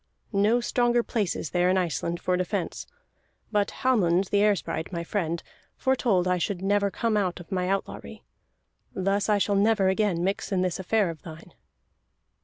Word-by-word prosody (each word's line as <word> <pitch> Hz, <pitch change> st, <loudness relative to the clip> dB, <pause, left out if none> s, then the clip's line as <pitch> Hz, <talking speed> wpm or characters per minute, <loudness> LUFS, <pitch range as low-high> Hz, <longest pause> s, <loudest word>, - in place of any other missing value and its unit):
No 210 Hz, +4 st, +3 dB
stronger 240 Hz, 0 st, +2 dB
place 210 Hz, -7 st, -1 dB
is 155 Hz, -, -5 dB
there 180 Hz, 0 st, +2 dB
in 185 Hz, -, +3 dB
Iceland 170 Hz, -1 st, -1 dB
for 180 Hz, +1 st, 0 dB
defence. 180 Hz, -1 st, -3 dB, 0.6 s
But 205 Hz, -2 st, +1 dB
Hallmund 195 Hz, -7 st, +3 dB
the 205 Hz, -, +3 dB
Air 210 Hz, 0 st, +4 dB
sprite, 160 Hz, -2 st, -4 dB
my 170 Hz, -2 st, -3 dB
friend, 170 Hz, -2 st, -2 dB, 0.3 s
foretold 235 Hz, -9 st, +1 dB
I 180 Hz, 0 st, +1 dB
should 185 Hz, +1 st, -2 dB
never 200 Hz, +1 st, +2 dB
come 225 Hz, +2 st, -1 dB
out 185 Hz, -4 st, 0 dB
of 175 Hz, +3 st, -13 dB
my 180 Hz, -1 st, -1 dB
outlawry. 195 Hz, 0 st, -4 dB, 0.7 s
Thus 195 Hz, +2 st, 0 dB
I 210 Hz, -, +4 dB
shall 205 Hz, +1 st, +1 dB
never 200 Hz, -1 st, +3 dB
again 190 Hz, -3 st, +1 dB
mix 195 Hz, +3 st, -2 dB
in 185 Hz, -1 st, +1 dB
this 185 Hz, 0 st, -1 dB
affair 190 Hz, -1 st, +1 dB
of 160 Hz, -, -12 dB
thine." 165 Hz, 0 st, -11 dB
195 Hz, 175 wpm, -26 LUFS, 180-210 Hz, 0.7 s, Air